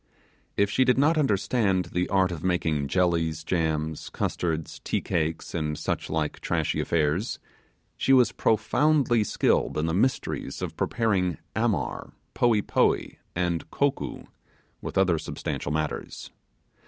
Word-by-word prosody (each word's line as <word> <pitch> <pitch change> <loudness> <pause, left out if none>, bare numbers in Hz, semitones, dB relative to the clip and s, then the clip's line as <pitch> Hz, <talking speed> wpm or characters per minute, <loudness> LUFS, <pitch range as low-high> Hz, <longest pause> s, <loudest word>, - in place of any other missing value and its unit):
If 100 0 +2
she 130 - +3
did 125 -1 +3
not 150 +4 +4
understand 100 - +1
the 90 +1 0
art 95 -2 +2
of 80 -3 -6
making 80 -6 0
jellies, 80 -1 +1
jams, 80 -3 -1
custard, 80 -3 -2 0.2
tea - - 0
cakes, 80 0 -2
and 75 -2 -2
such - - -3
like 80 -2 -2
trashy - - -1
affairs, 85 +7 0 0.6
she - - 0
was 130 -2 +6
profoundly 120 +2 +2
skilled - - +1
in 75 - +1
the 80 - -1
mysteries 130 +9 -1
of - - -4
preparing 95 -7 0 0.2
'amar', 110 -7 -1 0.2
'poee 115 -4 +3
poee', - - +1 0.2
and 85 -1 -1
'kokoo', 140 -1 -1 0.6
with - - -5
other 90 -4 +3
substantial 70 - -4
matters. 75 0 -3
90 Hz, 130 wpm, -26 LUFS, 80-110 Hz, 0.6 s, was